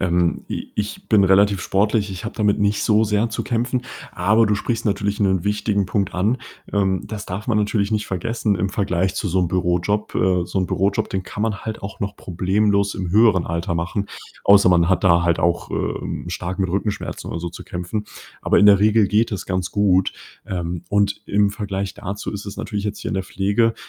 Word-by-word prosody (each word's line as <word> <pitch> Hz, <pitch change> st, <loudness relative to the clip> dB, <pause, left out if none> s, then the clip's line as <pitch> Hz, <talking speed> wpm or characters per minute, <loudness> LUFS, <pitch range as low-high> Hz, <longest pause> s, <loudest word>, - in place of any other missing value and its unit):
Ähm, 85 Hz, -2 st, +1 dB
i -, -, -5 dB
ich 105 Hz, -, -4 dB
bin 105 Hz, -4 st, +5 dB
relativ 100 Hz, 0 st, +4 dB
sportlich. 100 Hz, +2 st, +1 dB
Ich 95 Hz, +1 st, -7 dB
habe 110 Hz, -, -5 dB
damit 105 Hz, -2 st, +2 dB
nicht 105 Hz, 0 st, +1 dB
so 110 Hz, 0 st, +3 dB
sehr 105 Hz, +2 st, +1 dB
zu -, -, -3 dB
kämpfen, 125 Hz, 0 st, -1 dB, 0.3 s
aber 110 Hz, +5 st, +3 dB
du 105 Hz, -, +2 dB
sprichst 115 Hz, +2 st, -2 dB
natürlich 100 Hz, 0 st, -1 dB
'nen 95 Hz, -2 st, +2 dB
wichtigen 105 Hz, -1 st, 0 dB
Punkt 100 Hz, +1 st, -1 dB
an. 105 Hz, +8 st, +1 dB, 0.3 s
Ähm, 95 Hz, -2 st, +1 dB
das 105 Hz, -2 st, -6 dB
darf 95 Hz, +3 st, -5 dB
man 110 Hz, -3 st, +2 dB
natürlich 105 Hz, -1 st, 0 dB
nicht 105 Hz, -1 st, 0 dB
vergessen 105 Hz, +3 st, -1 dB
im 100 Hz, -, 0 dB
Vergleich 95 Hz, -1 st, 0 dB
zu 100 Hz, -, -2 dB
so 95 Hz, +2 st, +1 dB
'nem 90 Hz, -, +1 dB
Bürojob. 90 Hz, +4 st, 0 dB
Äh, 90 Hz, -1 st, +2 dB
so 95 Hz, -, -2 dB
'n 95 Hz, -, +1 dB
Bürojob, 100 Hz, +2 st, 0 dB
den 95 Hz, -, -2 dB
kann 105 Hz, +2 st, -5 dB
man 110 Hz, -2 st, 0 dB
halt 110 Hz, 0 st, -5 dB
auch 100 Hz, 0 st, -7 dB
noch 100 Hz, 0 st, -3 dB
problemlos 100 Hz, +3 st, +1 dB
im 90 Hz, -3 st, -4 dB
höheren 105 Hz, -4 st, +4 dB
Alter 85 Hz, +2 st, -2 dB
machen, 95 Hz, +5 st, -2 dB, 0.4 s
außer 100 Hz, -1 st, +6 dB
man 85 Hz, -1 st, +4 dB
hat 95 Hz, -, +1 dB
da 85 Hz, -2 st, +5 dB
halt 85 Hz, -1 st, +2 dB
auch, 85 Hz, +1 st, 0 dB
äh, -, -, -3 dB
ähm, -, -, -3 dB
stark 90 Hz, +2 st, -4 dB
mit 95 Hz, -, 0 dB
Rückenschmerzen 100 Hz, +2 st, -3 dB
oder 85 Hz, -, -4 dB
so 85 Hz, -, -3 dB
zu 85 Hz, -, -10 dB
kämpfen. 90 Hz, +4 st, -4 dB, 0.4 s
Aber -, -, +3 dB
in 105 Hz, -, +6 dB
der 100 Hz, -1 st, +7 dB
Regel 105 Hz, 0 st, +4 dB
geht 110 Hz, +2 st, +2 dB
es 100 Hz, -, -4 dB
ganz 90 Hz, -1 st, -2 dB
gut. 95 Hz, -2 st, +2 dB, 0.3 s
Ähm, 85 Hz, -2 st, -4 dB
und 100 Hz, 0 st, +1 dB
im 100 Hz, 0 st, +2 dB
Vergleich 100 Hz, -1 st, -4 dB
dazu 100 Hz, +1 st, -5 dB
ist 100 Hz, 0 st, -6 dB
es 100 Hz, -, -7 dB
natürlich 105 Hz, -2 st, -4 dB
jetzt 105 Hz, 0 st, -3 dB
hier -, -, -4 dB
in -, -, -3 dB
der 95 Hz, -, 0 dB
Pflege 100 Hz, +5 st, +1 dB
100 Hz, 215 wpm, -21 LUFS, 95-105 Hz, 0.4 s, der